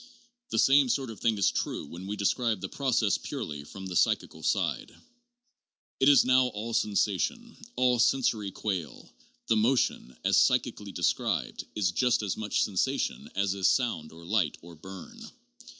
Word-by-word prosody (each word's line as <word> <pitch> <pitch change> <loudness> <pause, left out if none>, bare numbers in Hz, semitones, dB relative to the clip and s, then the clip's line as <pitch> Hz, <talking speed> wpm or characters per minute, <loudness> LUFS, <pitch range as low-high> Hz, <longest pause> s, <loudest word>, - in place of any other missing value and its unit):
The - - -2
same 135 -1 +5
sort 130 -2 -1
of 110 - -11
thing 115 -2 +1
is 100 - +3
true - - -3
when 90 +6 -9
we 105 - -3
describe 110 +1 0
the 95 - -4
process 120 -4 0
purely 75 -2 -6
from 95 +6 -10
the 95 -1 -5
psychical - - +1
side. - - -1 1.1
It 135 - +5
is 140 - +6
now 130 0 +4
all 115 0 -5
sensation, 110 - 0 0.2
all 125 -1 +2
sen 130 +3 +3
sory 105 -4 0
quale; 95 -6 -5 0.3
the 110 - +2
motion, 110 - +1
.as - - +3
psychically - - +1
described, - - -1
is 95 -3 +1
just 120 +3 +1
as 100 - -2
much, 105 -2 0
sensation 95 -4 -1
as 100 0 +1
is 95 -1 +1
sound 115 - 0
or 85 +1 -13
light 90 -5 0
or 85 0 -12
burn. 95 - -11
105 Hz, 165 wpm, -28 LUFS, 95-125 Hz, 1.1 s, is